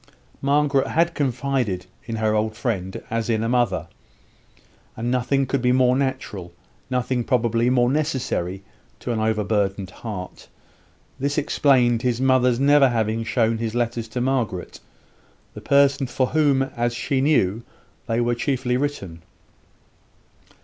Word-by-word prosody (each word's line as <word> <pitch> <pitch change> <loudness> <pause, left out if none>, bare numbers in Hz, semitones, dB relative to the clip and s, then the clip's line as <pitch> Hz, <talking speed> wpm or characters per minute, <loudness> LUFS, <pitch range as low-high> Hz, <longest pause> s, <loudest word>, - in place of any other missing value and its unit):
Margaret 140 -1 +2
had 170 +1 +1
confided 130 - -1 0.2
in 115 - -4
her 110 -1 +1
old 110 0 -1
friend 95 -6 -3
as 115 0 -1
in 110 -1 +1
a - - 0
mother; 120 -6 +1 1.1
and 120 +2 -2
nothing 130 +2 +1
could 135 0 -1
be 125 0 +2
more 125 0 +4
natural 130 -9 -3 0.4
nothing 125 -1 -1
probably 120 -1 +1
more 125 -1 +3
necessary 130 - -1 0.4
to 125 - -4
an 115 - -1
overburdened 105 -3 0
heart. 95 -3 -8 0.7
This 140 +2 -1
explained 130 -5 +3
his 125 -2 0
mother's 130 -2 +3
never 140 0 +5
having 115 -1 -1
shown 115 -1 +1
his 115 0 -3
letters 120 -1 -1
to 115 +3 -4
Margaret 120 -8 -2 0.7
the - - -9
person 140 -1 +3
for 130 +2 0
whom, 145 -4 +3
as 120 -2 -2
she 130 +2 -1
knew, 115 -8 +2 0.5
they 115 +1 0
were 120 0 +1
chiefly 125 0 -1
written. 100 - -4
120 Hz, 135 wpm, -23 LUFS, 110-135 Hz, 1.1 s, never